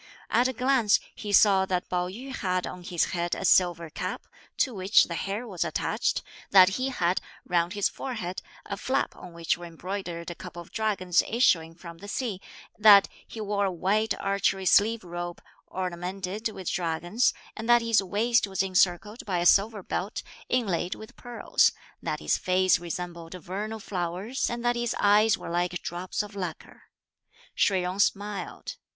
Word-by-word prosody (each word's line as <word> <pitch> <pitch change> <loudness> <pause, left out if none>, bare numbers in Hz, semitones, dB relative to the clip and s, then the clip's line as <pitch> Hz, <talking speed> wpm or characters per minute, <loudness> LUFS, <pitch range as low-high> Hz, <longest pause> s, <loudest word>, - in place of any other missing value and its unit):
At 245 +2 +4
a 260 - -2
glance, 250 -3 +3
he 205 - -6
saw 195 -1 +5
that 180 -1 -1
Pao 180 0 -1
yü 250 +8 -7
had 185 -3 -1
on 180 - -7
his 175 -1 0
head 175 -1 -1
a - - -4
silver 175 -3 +3
cap, - - -5 0.3
to 260 - +1
which 195 +1 +4
the 170 - -4
hair 200 +7 -3
was 185 -6 -2
attached, - - -1 0.3
that 185 -1 +8
he 255 +7 -1
had, 180 -8 0 0.2
round 175 +1 +1
his 205 -2 +1
forehead, 190 -9 -5 0.2
a 200 - -5
flap 265 +7 -1
on 180 - -11
which 170 0 -1
were 175 - -8
embroidered 175 0 -5
a - - -4
couple 175 - -10
of 170 - -11
dragons 195 -5 +1
issuing 165 -9 +2
from 170 -1 -11
the 205 - -10
sea, 205 -3 -3 0.4
that 205 -2 +8 0.2
he 225 - -9
wore 205 -1 0
a 190 - 0
white 200 +5 +1
archery 195 -1 0
sleeved 215 +4 +4
robe, 175 0 -6 0.3
ornamented 185 +4 -4
with 190 -5 -9
dragons, 175 +6 +1 0.2
and 225 +1 -6
that 240 -1 +6
his 230 -2 +3
waist 215 +4 +1
was 195 0 0
encircled 190 +3 +1
by 185 -3 0
a 175 - 0
silver 200 +2 +4
belt, 195 +5 -3 0.3
inlaid 190 -7 0
with 220 +4 -12
pearls; 245 -1 +1 0.3
that - - -3
his - - 0
face 185 0 +3
resembled 170 0 -6
vernal 200 +6 -5
flowers 190 +5 -3
and 240 0 -4
that 240 0 +2
his 240 0 -1
eyes 205 0 +4
were - - -7
like 175 0 -1
drops 180 +4 -3
of 205 0 -11
lacquer. 180 -5 -7 0.6
Shih 190 -2 +2
Jung 180 +2 -3
smiled. 205 0 -1
190 Hz, 170 wpm, -27 LUFS, 175-215 Hz, 0.6 s, that